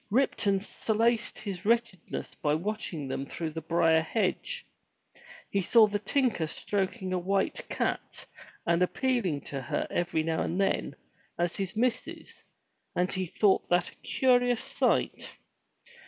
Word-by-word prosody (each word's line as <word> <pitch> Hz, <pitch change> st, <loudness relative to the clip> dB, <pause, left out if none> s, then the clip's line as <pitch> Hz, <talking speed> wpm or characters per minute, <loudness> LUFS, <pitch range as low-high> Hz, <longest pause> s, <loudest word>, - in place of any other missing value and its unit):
Ripton 205 Hz, -5 st, +2 dB
solaced 225 Hz, +2 st, 0 dB
his 190 Hz, -4 st, -5 dB
wretchedness 230 Hz, -5 st, -1 dB
by 150 Hz, 0 st, 0 dB
watching 175 Hz, -5 st, -3 dB
them 135 Hz, +1 st, -3 dB
through 160 Hz, +1 st, -4 dB
the 160 Hz, +1 st, -5 dB
briar 160 Hz, 0 st, +3 dB
hedge. 225 Hz, -, -1 dB, 0.9 s
He 200 Hz, -, +2 dB
saw 225 Hz, +4 st, +6 dB
the 205 Hz, -1 st, -1 dB
tinker 235 Hz, -, +1 dB
stroking 190 Hz, +2 st, -2 dB
a 180 Hz, -, +1 dB
white 195 Hz, +2 st, -1 dB
cat, -, -, -2 dB, 0.4 s
and 170 Hz, +1 st, +2 dB
appealing 190 Hz, -, +1 dB
to 140 Hz, -1 st, -5 dB
her 125 Hz, -, -2 dB
every 175 Hz, -2 st, 0 dB
now 160 Hz, 0 st, 0 dB
and 175 Hz, -, -1 dB
then, 195 Hz, -, 0 dB, 0.4 s
as 175 Hz, 0 st, 0 dB
his 195 Hz, 0 st, -3 dB
missus, 245 Hz, +2 st, -2 dB, 0.5 s
and 180 Hz, +1 st, +1 dB
he 185 Hz, -1 st, -1 dB
thought 195 Hz, +4 st, +2 dB
that 175 Hz, 0 st, +2 dB
a -, -, -22 dB
curious 245 Hz, -2 st, +2 dB
sight. -, -, 0 dB
190 Hz, 140 wpm, -29 LUFS, 170-225 Hz, 0.9 s, saw